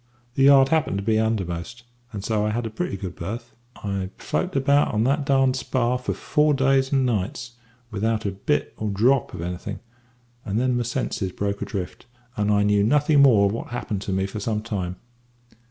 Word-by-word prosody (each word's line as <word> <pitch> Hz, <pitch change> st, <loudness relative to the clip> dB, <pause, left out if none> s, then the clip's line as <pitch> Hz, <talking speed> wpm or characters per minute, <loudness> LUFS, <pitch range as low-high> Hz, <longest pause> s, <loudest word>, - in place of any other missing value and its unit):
The 135 Hz, +1 st, +3 dB
yard 135 Hz, -1 st, +7 dB
happened 155 Hz, -10 st, +1 dB
to 100 Hz, -, -3 dB
be 110 Hz, +1 st, +2 dB
undermost, 110 Hz, 0 st, -2 dB, 0.3 s
and 100 Hz, -3 st, -6 dB
so 105 Hz, -1 st, 0 dB
I 105 Hz, -, +1 dB
had 115 Hz, +2 st, -2 dB
a 110 Hz, -, -4 dB
pretty 145 Hz, -, -3 dB
good 95 Hz, -2 st, -6 dB
berth. 115 Hz, +7 st, -6 dB, 0.3 s
"I 100 Hz, -2 st, -2 dB
floated 185 Hz, -4 st, -2 dB
about 140 Hz, -2 st, +2 dB
on 110 Hz, -, +2 dB
that 135 Hz, -1 st, +2 dB
spar 125 Hz, -1 st, 0 dB
for 125 Hz, -, -2 dB
four 150 Hz, 0 st, +2 dB
days 135 Hz, 0 st, +2 dB
and 135 Hz, -2 st, +2 dB
nights 120 Hz, +3 st, -2 dB, 0.4 s
without 110 Hz, +1 st, -1 dB
a 100 Hz, -, 0 dB
bit 95 Hz, +1 st, -1 dB
or 110 Hz, -, -2 dB
drop 120 Hz, +7 st, +2 dB
of 85 Hz, -, -6 dB
anything, 90 Hz, +1 st, -5 dB, 0.6 s
and 100 Hz, +3 st, -1 dB
then 125 Hz, 0 st, +1 dB
my 120 Hz, -, 0 dB
senses 120 Hz, -5 st, -2 dB
broke 100 Hz, +1 st, -3 dB
adrift, 100 Hz, +3 st, -5 dB, 0.3 s
and 105 Hz, 0 st, +1 dB
I 105 Hz, 0 st, +3 dB
knew 105 Hz, 0 st, +3 dB
nothing 145 Hz, +5 st, +4 dB
more 115 Hz, -8 st, +6 dB
of 100 Hz, -, +2 dB
what 115 Hz, -, -5 dB
happened 110 Hz, -5 st, -4 dB
to 100 Hz, -, -4 dB
me 95 Hz, 0 st, 0 dB
for 100 Hz, +2 st, -5 dB
some 105 Hz, 0 st, -2 dB
time. 95 Hz, -6 st, -3 dB
110 Hz, 195 wpm, -24 LUFS, 100-135 Hz, 0.6 s, yard